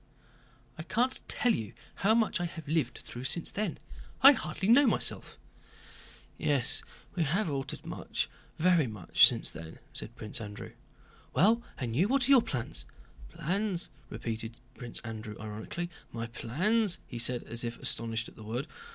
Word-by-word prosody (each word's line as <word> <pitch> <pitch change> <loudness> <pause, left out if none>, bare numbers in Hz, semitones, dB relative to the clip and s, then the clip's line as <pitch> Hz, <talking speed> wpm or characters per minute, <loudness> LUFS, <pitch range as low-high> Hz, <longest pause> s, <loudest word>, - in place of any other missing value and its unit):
"I - - -2
can't 245 +9 0
tell 245 - +3
you 110 -3 -3 0.2
how 215 +4 +4
much 225 -6 +2
I - - 0
have 165 -3 -7
lived 145 -5 0
through 120 +1 -8
since 160 +5 +2
then. 205 -5 -2 0.5
I 275 - +13
hardly 190 - -2
know 260 +5 +7
myself - - 0 1.0
again." - - 0
"Yes, - - +3 0.3
we 180 - -1
have 165 +3 +1
altered 135 -1 -4
much, - - -2 0.3
very 170 -4 +4
much, 105 -6 +6
since - - -1
then," 80 0 -9 0.2
said - - -6
Prince 105 +1 -3
Andrew. 105 -1 -7 0.6
"Well, 220 +7 +5 0.2
and 120 -4 -3
you? 175 +9 +4
What 260 +1 +2
are - - +4
your 265 -3 +9
plans?" 120 - -1 0.4
"Plans!" 185 - -1 0.2
repeated 115 0 -4 0.2
Prince 120 -2 -6
Andrew 110 -2 -6
ironically. 110 +11 -5 0.2
"My 115 0 -3
plans?" 180 - +1
he 120 - -7
said, 120 +1 +1
as 115 +1 -3
if 120 0 -3
astonished 115 0 -2
at - - -14
the 110 - -11
word. 120 +6 -3
140 Hz, 160 wpm, -31 LUFS, -, 1.0 s, I